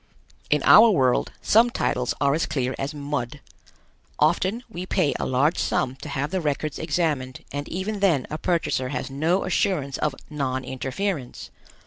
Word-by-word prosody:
In 150 -1 +2
our 225 +2 +8
world 130 - +2
some 230 +3 +5
titles 125 - -1
are 140 0 +3
as 160 - 0
clear 130 -2 -1
as 135 +1 -2
mud. 145 -3 -4 0.8
Often 215 +7 +1
we 185 -5 -7
pay 180 -7 +1
a - - -1
large 140 +6 +2
sum 130 +1 0
to 150 - -8
have 140 +2 -2
the 190 -1 -1
records 150 -1 -2
examined 150 -6 -1
and 145 +1 -5
even 200 +4 -3
then 170 -10 +2
a 155 - -3
purchaser 165 -7 0
has 130 0 -4
no 160 +7 +1
assurance 145 -9 0
of 150 -3 0
non 130 -3 -2
interference. 135 +3 -4
145 Hz, 160 wpm, -24 LUFS, 130-180 Hz, 0.8 s, our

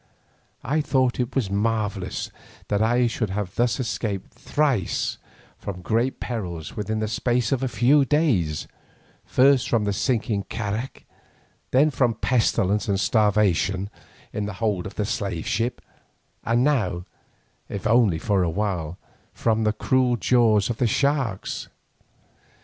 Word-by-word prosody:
I 150 +5 +1
thought 130 -4 +1
it 120 -4 -1
marvellous 105 -2 -1 0.4
that 105 0 +1
I 120 +2 +3
should 115 -2 -1
thus 105 +4 0
have 130 - -2
escaped 100 -4 -3
thrice 135 - 0 0.4
from 90 -2 -6
great 115 +7 0
perils 90 -10 -5
within 110 +1 -2
the 110 0 -1
space 120 +1 0
of 135 - +1
a 135 - 0
few 130 +5 +4
days, 120 - +1 0.6
first 135 -1 +4
from 115 -3 +2
the 100 -1 0
sinking 110 -3 0
carak, 110 +3 -4 0.6
then 145 +4 +4
from 120 -3 +1
pestilence 105 -4 +1
and 100 -1 +1
starvation 100 -3 +2 0.4
in 105 -1 -2
the 105 - -5
hold 100 -2 -1
of - - -10
the 105 - -1
slave 100 -5 -3
ship, 120 +2 -1 0.6
and 115 +2 +2
now, 110 -11 +1 0.6
if 100 - -5
only 110 -6 +4
for 100 +3 +1
a 90 - +1
while, 90 -3 -2 0.4
from 110 -1 +1
the 105 - +3
cruel 125 +2 +2
jaws 115 -4 +3
of 115 - -5
the 125 - +2
sharks. 140 -5 -1
110 Hz, 140 wpm, -24 LUFS, 100-125 Hz, 0.6 s, few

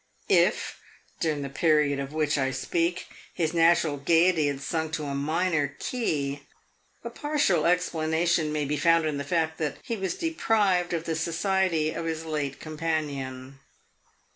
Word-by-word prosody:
If, - - +2 0.4
during 150 -3 -1
the 140 - -4
period 150 -1 +2
of 140 0 -4
which 155 -1 0
I 135 -2 +1
speak, 170 +6 -1 0.3
his 160 -2 0
natural 165 -3 +3
gayety 165 +2 +3
had 140 -1 -2
sunk 160 +2 -3
to 155 - -2
a 140 -1 -3
minor 150 0 0
key, 145 - -2 0.6
a - - -5
partial 285 - +1
explanation 165 -2 +1
may 150 -1 -1
be 150 +2 -1
found 165 +2 +3
in 150 -2 -1
the - - -2
fact 160 +1 -1
that 150 -3 -2
he 230 - -3
was 190 -3 -2
deprived 205 - +1
of 165 -1 -1
the 165 -1 -2
society 170 0 0
of 165 - -5
his 160 0 -3
late 145 -4 -3
companion. 140 -5 -4
160 Hz, 155 wpm, -27 LUFS, 145-170 Hz, 0.6 s, natural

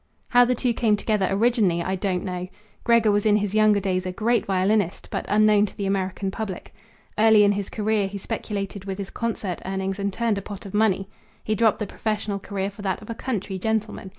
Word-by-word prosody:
"How 245 0 +6
the 250 +1 +1
two 245 0 0
came 220 -2 +2
together 205 -2 0
originally 200 -5 +2
I 190 - -1
don't 185 -1 -1
know. 180 -1 -4 0.4
Gregor 235 -3 +4
was 205 0 +2
in 210 -1 +4
his 205 -1 0
younger 215 -1 +4
days 185 -2 -1
a - - -2
great 230 +6 0
violinist, 195 0 +1
but - - -3
unknown 210 0 +4
to - - -14
the 200 - -2
American 195 0 -1
public. 200 -3 -6 0.5
Early 220 -1 +6
in 205 - +5
his 200 -1 -2
career 215 -2 0
he 200 +1 -6
speculated 200 -2 -4
with 195 -1 -4
his 200 -1 -5
concert 215 -6 -3
earnings 190 +1 -3
and 200 0 -1
turned 225 0 0
a - - -8
pot 200 0 -9
of 195 - -9
money. 205 -3 +2 0.4
He 215 - -1
dropped 220 -1 +3
the 210 - -3
professional 210 0 -3
career 195 0 -3
for 200 - -12
that 190 -2 -1
of 215 - -7
a - - -2
country 210 -6 -4
gentleman. 220 -1 -2
205 Hz, 215 wpm, -24 LUFS, 195-215 Hz, 0.5 s, How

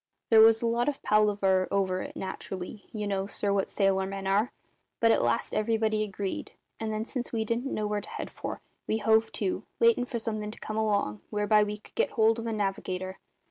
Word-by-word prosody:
"There 220 -1 +9
was 225 +1 +6
a - - +2
lot 235 +3 +2
of 285 - -6
palaver 200 -3 +3
over 185 -2 0
it, - - -7
naturally 190 +1 -6
you 210 -2 -3
know, 195 -1 -1
sir, 200 0 0
what 195 -1 0
sailor 195 -1 +1
men 195 0 -5
are 200 +4 +2 0.5
but 230 0 +5
at - - +3
last 120 0 0
everybody 220 0 +1
agreed; 200 -2 -4 0.3
and 220 -1 -2
then, 215 +1 -2
since 245 0 -4
we 225 -2 -1
didn't 235 +5 -1
know 215 - -1
where 210 0 -1
to - - -8
head - - -6
for, - - -6 0.3
we 220 - +1
hove 220 +1 +3
to, 195 -3 -1 0.2
waitin' 235 +1 +4
for 250 -1 -4
something 215 -2 -3
to 215 - -10
come 215 - -5
along 200 - 0
whereby 210 0 +3
we 210 0 -3
could 210 - -19
get - - 0
hold 225 0 +3
of 230 - -4
a - - -1
navigator. 190 -2 -3
210 Hz, 215 wpm, -28 LUFS, 195-225 Hz, 0.5 s, There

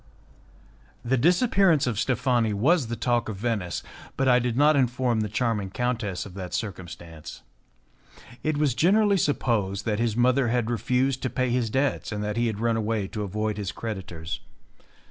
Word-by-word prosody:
The 130 +3 +2
disappearance 180 - +3
of 120 -5 -1
Steffani 125 -3 +1
was 135 - +2
the 115 - -3
talk 120 -1 0
of 110 - -4
Venice, 105 -4 -2 0.3
but 135 - +1
I 125 -1 +6
did 120 -1 -2
not 150 +2 +5
inform 125 -3 +1
the 105 -1 -1
charming 110 -3 -1
countess 115 -4 -2
of 100 - -10
that 90 -1 -5
circumstance. 85 - -7 1.0
It 155 -1 -1
was 145 -4 +2
generally 200 - +3
supposed 105 - 0
that 105 -2 0
his 115 -2 0
mother 125 +1 +3
had 120 0 0
refused 125 +3 0
to 130 - -1
pay 130 -1 -1
his 120 -2 0
debts, 135 +2 0
and 105 -1 -3
that 105 0 -2
he 120 0 +1
had 110 -2 -3
run 115 0 +1
away 110 -2 -1
to 105 - -5
avoid 105 +1 -2
his 100 -2 -3
creditors. 90 -7 -6
115 Hz, 170 wpm, -26 LUFS, 105-130 Hz, 1.0 s, I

